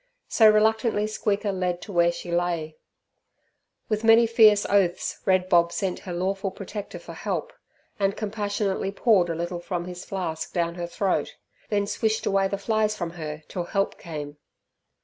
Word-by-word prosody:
So 220 Hz, -2 st, +6 dB
reluctantly 220 Hz, 0 st, +3 dB
Squeaker 210 Hz, -1 st, -1 dB
led 180 Hz, -2 st, -1 dB
to 210 Hz, -, -8 dB
where 170 Hz, -2 st, +4 dB
she 175 Hz, 0 st, -7 dB
lay. 170 Hz, -3 st, -1 dB, 1.1 s
With 215 Hz, 0 st, -1 dB
many 225 Hz, +1 st, +7 dB
fierce 220 Hz, -3 st, +5 dB
oaths 190 Hz, -3 st, +1 dB
Red 185 Hz, -1 st, +3 dB
Bob 170 Hz, -2 st, +4 dB
sent 180 Hz, +1 st, -2 dB
her -, -, -3 dB
lawful 195 Hz, +3 st, -1 dB
protector 200 Hz, +2 st, -7 dB
for -, -, -10 dB
help, -, -, -3 dB, 0.5 s
and 195 Hz, 0 st, +1 dB
compassionately 205 Hz, -2 st, -2 dB
poured 200 Hz, -4 st, +3 dB
a 165 Hz, -, -1 dB
little 175 Hz, +1 st, -3 dB
from 175 Hz, 0 st, -4 dB
his 180 Hz, 0 st, -7 dB
flask 170 Hz, -5 st, -4 dB
down 170 Hz, -2 st, 0 dB
her 175 Hz, 0 st, -5 dB
throat, 190 Hz, +2 st, -1 dB, 0.3 s
then 205 Hz, -1 st, +1 dB
swished 220 Hz, +1 st, -1 dB
away 195 Hz, 0 st, +2 dB
the 200 Hz, -, -3 dB
flies 215 Hz, +1 st, 0 dB
from 170 Hz, -3 st, -3 dB
her 155 Hz, -2 st, -6 dB
till 175 Hz, -2 st, -4 dB
help 195 Hz, +1 st, -1 dB
came. 150 Hz, -3 st, -7 dB
195 Hz, 165 wpm, -25 LUFS, 175-210 Hz, 1.1 s, many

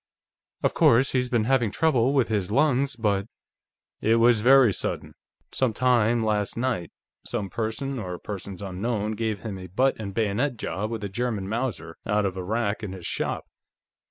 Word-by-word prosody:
Of -, -, +2 dB
course, 125 Hz, +4 st, +4 dB
he's 125 Hz, -1 st, 0 dB
been 120 Hz, -3 st, +2 dB
having 125 Hz, -1 st, +2 dB
trouble 130 Hz, -1 st, +2 dB
with 135 Hz, -5 st, +3 dB
his 105 Hz, -5 st, -1 dB
lungs, 140 Hz, +1 st, +2 dB
but 105 Hz, -3 st, 0 dB, 0.4 s
" -, -, -67 dB, 0.3 s
"It 110 Hz, +1 st, +3 dB
was 115 Hz, -1 st, +4 dB
very 130 Hz, -2 st, +6 dB
sudden. -, -, -3 dB, 0.4 s
Some 130 Hz, -4 st, 0 dB
time 120 Hz, -2 st, +2 dB
last 105 Hz, -1 st, -1 dB
night, 115 Hz, -9 st, -1 dB, 0.3 s
some 105 Hz, -5 st, -4 dB
person 120 Hz, +4 st, -3 dB
or 90 Hz, -4 st, -5 dB
persons 100 Hz, -1 st, -7 dB
unknown 105 Hz, +3 st, -2 dB
gave 110 Hz, -2 st, -2 dB
him 100 Hz, -4 st, -5 dB
a 90 Hz, -, -8 dB
butt 130 Hz, +9 st, +1 dB
and 100 Hz, -3 st, -4 dB
bayonet 115 Hz, +6 st, 0 dB
job 105 Hz, 0 st, -3 dB
with 115 Hz, -2 st, -4 dB
a -, -, -1 dB
German 110 Hz, -2 st, -2 dB
Mauser 110 Hz, -7 st, -3 dB
out 105 Hz, 0 st, +1 dB
of 95 Hz, -1 st, -2 dB
a 95 Hz, -, -4 dB
rack 110 Hz, +2 st, -1 dB
in 100 Hz, -3 st, -5 dB
his 90 Hz, -3 st, -9 dB
shop. -, -, -2 dB
110 Hz, 180 wpm, -25 LUFS, 100-125 Hz, 0.4 s, very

